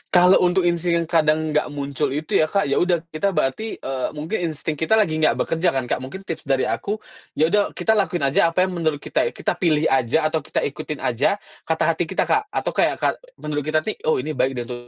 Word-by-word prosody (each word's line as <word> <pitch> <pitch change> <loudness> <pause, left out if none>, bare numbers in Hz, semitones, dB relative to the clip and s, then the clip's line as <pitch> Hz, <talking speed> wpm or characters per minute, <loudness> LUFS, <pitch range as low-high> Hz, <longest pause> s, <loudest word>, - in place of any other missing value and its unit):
Kalau 180 +1 +7
untuk 180 +1 +2
insting 170 0 +1
yang - - -9
kadang 155 -1 +2
nggak 150 0 +1
muncul 140 -2 -2
itu 155 +1 0
ya 155 - +3
Kak, 200 +4 +1
ya 140 - +1
udah, 175 -2 +1
kita 190 +5 -1
berarti, 155 +10 -1
eee, 130 -1 -3
mungkin 155 +8 -3
insting 155 -1 -4
kita 160 +7 +3
lagi 165 -8 +2
nggak 155 - +3
bekerja 165 +2 +1
kan, 130 - 0
Kak. 125 - -2
Mungkin 135 +10 -8
tips 165 -6 -6
dari 135 -1 +2
aku, 205 - -1 0.4
ya 160 +2 +2
udah, 205 -1 +1
kita 220 - +1
lakuin 195 -7 +1
aja 140 +4 +3
apa 180 +2 +2
yang 185 - -1
menurut 160 -4 -1
kita - - 0
it 470 - -6
kita - - -2
pilih 160 -5 +2
aja 135 +4 +2
atau 160 - +1
kita - - -3
ikutin - - -4
aja - - +1 0.3
kata - - +1
hati - - -2
kita, - - 0
Kak. 425 - +1
Atau - - -2
kayak - - +2
ka - - +1 0.3
menurut 150 -1 -3
kita 155 0 +1
nih, 215 - -4
"Oh, 155 - +4
ini 150 +5 -3
baik 135 -2 0
deh 120 - -3
untuk 120 0 -8
155 Hz, 240 wpm, -22 LUFS, 145-180 Hz, 0.4 s, Kalau